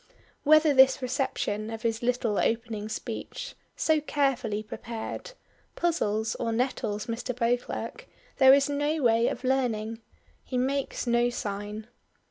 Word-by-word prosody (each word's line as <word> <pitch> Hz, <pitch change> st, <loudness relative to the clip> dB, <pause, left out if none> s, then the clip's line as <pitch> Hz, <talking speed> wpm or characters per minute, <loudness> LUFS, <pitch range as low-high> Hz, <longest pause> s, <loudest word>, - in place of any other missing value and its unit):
Whether 310 Hz, 0 st, +6 dB
this 265 Hz, 0 st, +6 dB
reception 245 Hz, -5 st, -1 dB
of 225 Hz, -1 st, -6 dB
his 225 Hz, -1 st, 0 dB
little 240 Hz, -3 st, 0 dB
opening 225 Hz, -2 st, -1 dB
speech 220 Hz, -, -5 dB, 0.2 s
so 315 Hz, -1 st, +2 dB
carefully 255 Hz, -8 st, 0 dB
prepared 225 Hz, -, -6 dB, 0.4 s
puzzles 220 Hz, -10 st, 0 dB
or 230 Hz, -, -1 dB
nettles 225 Hz, -3 st, -1 dB
Mr. 235 Hz, +1 st, -3 dB
Beauclerk 240 Hz, 0 st, -2 dB, 0.3 s
there 265 Hz, -2 st, +8 dB
is 275 Hz, +1 st, +5 dB
no 290 Hz, +1 st, 0 dB
way 230 Hz, 0 st, +4 dB
of 250 Hz, -, -3 dB
learning. 230 Hz, -4 st, 0 dB, 0.4 s
He 255 Hz, -, -4 dB
makes 270 Hz, +2 st, -1 dB
no 240 Hz, 0 st, +3 dB
sign. 205 Hz, -1 st, -5 dB
240 Hz, 125 wpm, -28 LUFS, 220-270 Hz, 0.4 s, there